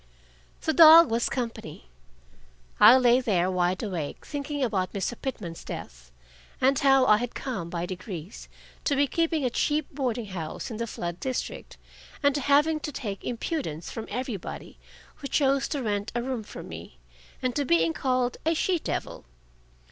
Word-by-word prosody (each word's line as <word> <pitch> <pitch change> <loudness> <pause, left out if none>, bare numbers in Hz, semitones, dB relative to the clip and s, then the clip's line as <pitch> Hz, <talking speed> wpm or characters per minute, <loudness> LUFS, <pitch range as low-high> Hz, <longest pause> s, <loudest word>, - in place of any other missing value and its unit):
The 315 - 0
dog 325 -2 +9
was 230 +1 +1
company. 230 - -5 0.9
I 250 - +9
lay 250 0 +4
there, 185 -6 +1
wide 180 +1 0
awake, 175 -9 -5
thinking 290 -1 -3
about 195 -6 -1
Mr. 200 +4 -2
Pitman's 190 -11 -5
death, - - -9 0.5
and 265 +1 +3
how 270 -1 +5
I 210 - +6
had 245 +2 -4
come, 210 -11 -4
by 170 0 -3
degrees, 185 -1 -8 0.4
to 285 - +2
be 285 +1 +3
keeping 320 0 0
a 250 - 0
cheap 295 +4 -1
boarding 250 -4 -2
house 180 +2 -6
in 220 - -5
the 230 +1 -3
flood 175 -4 -5
district, 260 -1 -4 0.5
and 285 0 +4
to 285 - -2
having 295 +4 +3
to 300 - -5
take 205 -7 -5
impudence 235 - -4
from 225 - -6
everybody 245 -7 -6 0.4
who 280 - -6
chose 275 0 +2
to 285 -4 -3
rent 205 -2 -2
a 240 - 0
room 255 -2 -3
from 210 - -10
me, 80 -6 -10 0.4
and 255 -1 -2
to 290 - +1
being 165 -8 +2
called 255 +1 0
a 325 +1 +1
she 355 +2 +1
devil. - - -4
245 Hz, 165 wpm, -27 LUFS, 185-280 Hz, 0.9 s, dog